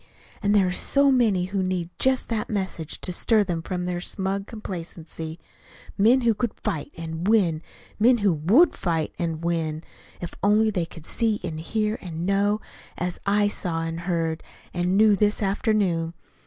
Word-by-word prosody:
and 205 -1 +2
there 200 -2 +5
are 180 - 0
so 280 +9 +3
many 220 -8 +3
who 195 +1 -2
need 185 -2 -2
just 260 0 +2
that 225 -2 -2
message 190 -6 -3
to 180 - -3
stir 215 +3 +3
them 175 -4 -2
from 180 +1 -3
their 175 -1 -2
smug 195 +2 -2
complacency 165 -5 -6 0.6
men 230 +6 +5
who 235 -2 +3
could 230 +1 -2
fight, 150 -3 -3
and 165 +2 -4
win: 185 -8 +3 0.4
men 240 +3 +5
who 205 -5 +2
WOULD 200 - +4
fight, 165 -4 -1
and 165 -1 -2
win, 165 -2 -1 0.4
if 175 - -6
only 215 +2 +4
they 180 -5 -1
could 165 -2 -12
see 220 +1 0
and 160 -3 -4
hear 215 +6 -1
and 170 -2 -5
know, 200 +2 +2 0.4
as 180 0 -3
I 205 +1 +3
saw 175 -5 -1
and 165 0 -3
heard 165 -2 -1 0.3
and 180 +2 +1
knew 215 -1 +6
this 210 +1 +1
afternoon. 195 -5 0
185 Hz, 170 wpm, -25 LUFS, 165-210 Hz, 0.6 s, knew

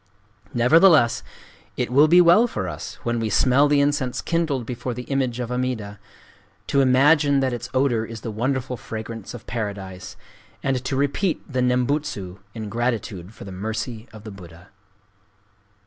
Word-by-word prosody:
Nevertheless 140 +1 +5 0.6
it - - -2
will 145 +4 +6
be 175 +3 +7
well 175 +8 +6
for 95 - -4
us, 80 -4 -6
when 120 0 -1
we 110 -1 -1
smell 130 +7 +4
the 145 0 +3
incense 140 -3 0
kindled 160 -7 -1
before 125 +1 -4
the 125 - -5
image 130 -3 -1
of 120 -1 -4
Amida, 125 -5 -3 0.7
to 140 - +2
imagine 140 +2 +4
that 130 -2 0
its 120 +1 -5
odor 130 -4 +1
is 115 -1 -8
the 115 - -5
wonderful 125 +3 -2
fragrance 110 0 -7
of 120 - -11
Paradise, 100 -3 -5 0.5
and 130 -2 0
to 135 - -1
repeat 145 +7 0
the 130 -3 -1
Nembutsu 125 -7 -1 0.2
in 110 -2 -5
gratitude 105 -5 -3
for - - -10
the 100 - -8
mercy 110 +4 -5
of 110 -2 -12
the 110 - -8
Buddha." 90 -2 -13
125 Hz, 160 wpm, -23 LUFS, 110-140 Hz, 0.7 s, be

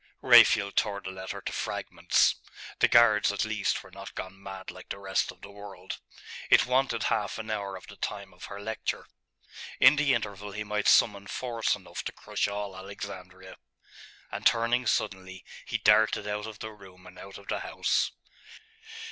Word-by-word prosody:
Raphael 100 -2 +7
tore 100 -1 0
the 95 -1 -7
letter 95 0 -7
to - - -5
fragments.... - - +1 0.5
The - - +6
guards, 110 -4 +5
at 100 - -1
least, 110 -2 -1
were 100 - -15
not 95 +1 -10
gone 95 +1 -7
mad 95 -1 -8
like - - -13
the - - -4
rest 95 -1 -1
of - - -20
the 100 - -11
world. 100 -2 -9 0.5
It - - +6
wanted 125 -2 +1
half 105 -2 0
an 110 0 -5
hour 100 -2 -3
of 90 - -10
the 100 - -13
time 100 -2 -5
of 90 - -10
her 100 - -8
lecture. 110 +1 -4 0.7
In 150 - +7
the 140 -2 +3
interval 105 -2 -5
he 105 +1 -4
might 105 0 -1
summon 100 0 +4
force 115 -1 -1
enough - - -8
to - - -3
crush - - -2
all 100 -1 -4
Alexandria. 95 -1 -9 0.7
And - - -5
turning 120 +1 +3
suddenly, 95 -4 -2 0.2
he - - -1
darted 105 -1 +3
out 105 +1 -3
of 110 -2 -9
the 110 0 -7
room 95 -3 -16
and 90 0 -13
out 95 0 -10
of 100 - -15
the - - -1
house. - - 0
100 Hz, 180 wpm, -28 LUFS, 95-110 Hz, 0.7 s, Raphael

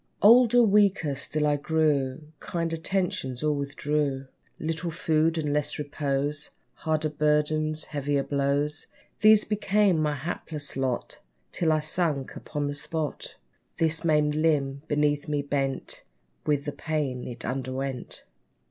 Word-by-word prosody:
Older 240 +2 +7
weaker 200 -8 +3
still 150 +3 0
I 145 -1 +2
grew: 145 -2 0 0.2
Kind 165 -1 -3
attentions 165 -6 -1
all 150 -1 +2
withdrew! 140 -1 -1 0.3
Little 165 +2 -2
food, 160 -1 +1
and 150 -2 -1
less 150 0 0
repose; 145 0 -2 0.2
Harder 155 -1 -1
burdens 150 +1 +1
heavier 145 -1 -1
blows, 145 +2 0 0.3
These 215 0 +6
became 205 -4 +2
my 150 -1 0
hapless 150 0 -4
lot, 130 -2 -2 0.3
Till 165 -2 +1
I 155 -1 +2
sunk 155 -3 -1
upon 145 -1 -4
the 145 - -2
spot! 150 +1 -4 0.4
This 160 0 +2
maimed 150 -2 +3
limb 145 -3 +1
beneath 145 0 +1
me 145 -1 -1
bent 135 -1 -2 0.5
With 145 -1 +1
the 145 - -2
pain 145 -5 -3
it 120 -1 -6
underwent. 130 0 -4
150 Hz, 130 wpm, -27 LUFS, 140-160 Hz, 0.5 s, Older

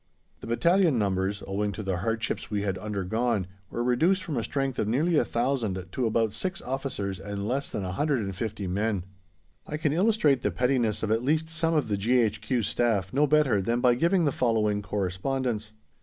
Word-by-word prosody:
The - - -9
battalion 170 +5 +3
numbers, 100 -1 0
owing 100 +1 -1
to 110 - -5
the 95 -2 -1
hardships 115 +4 -2
we 105 -1 -1
had 95 -2 -2
undergone, 105 +1 -1 0.2
were 120 - -2
reduced 165 +11 +2
from 155 - -4
a 115 - -1
strength 135 -1 -2
of 105 - 0
nearly 155 +10 +2
1,000 120 -9 0
to 125 - -1
about 110 -1 +1
six 185 0 -3
officers 125 -8 -3
and 100 +1 -4
less 135 +4 -1
than 100 - -3
150 100 - -2
men. 100 +1 -1 0.6
I 150 - -3
can 155 -2 0
illustrate 170 - +3
the - - +1
pettiness 125 -5 0
of 110 - 0
at 110 +1 +2
least 155 +5 +1
some 165 0 0
of 150 -6 +1
the 105 -2 0
G.H.Q. 115 +1 +1
Staff 105 -4 0
no 145 +3 +3
better 140 -9 +3
than 115 +5 0
by 125 0 +4
giving 170 +7 +2
the 145 - +2
following 110 -5 +1
correspondence. 105 +4 -2
115 Hz, 180 wpm, -27 LUFS, 100-140 Hz, 0.6 s, by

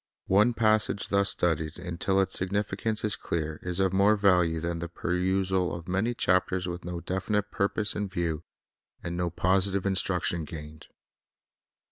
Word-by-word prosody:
One 105 +5 +4
passage 110 -3 +1
thus 100 0 +3
studied 80 -2 0
until 90 +2 -1
its 95 - -2
significance 105 +3 -1
is 105 -1 +4
clear, 80 -1 -3
is 90 0 -1
of 95 -1 +2
more 100 +3 +4
value 90 -5 +3
than 85 +1 -3
the 85 0 -5
perusal 90 +1 0
of 85 0 -9
many 100 +7 0
chapters 95 -2 +1
with 90 0 -5
no 85 0 -5
definite 105 +3 -2
purpose 105 +2 0
in 105 -1 -2
view, 85 -4 -2 0.6
and 85 0 -3
no 90 0 -1
positive 95 +3 +1
instruction 90 -3 +1
gained. 75 0 -9
95 Hz, 150 wpm, -28 LUFS, 85-100 Hz, 0.6 s, One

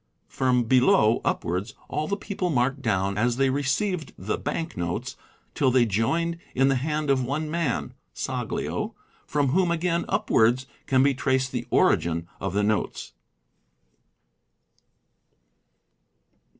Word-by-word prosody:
From 125 -2 +1
below 120 -2 +4
upwards:—all 105 - -2
the 200 - -1
people 195 -2 -3
are 170 - -1
marked 130 +3 +1
down 95 -3 0
as 120 +2 +1
they 135 -1 +3
received 145 +6 -1
the 100 +4 -2
bank 160 +3 -4
notes 85 -1 -3 0.4
till 135 - +2
they 125 -1 +4
joined 165 - 0 0.2
in 135 +1 +4
the 135 - +2
hand 150 +2 -1
of 130 -2 +2
one 150 +5 -2
man 165 -7 -1 0.2
(Saglio), - - -3 0.3
from 145 -2 +1
whom 180 +5 +2
again 170 0 0
upwards 120 +4 +2 0.2
can 130 -1 +4
be 140 0 +4
traced 130 -1 0
the 120 -1 -4
origin 85 -5 +2
of 95 - -3
the 105 - +2
notes. 105 0 -1
130 Hz, 130 wpm, -25 LUFS, 115-155 Hz, 0.4 s, below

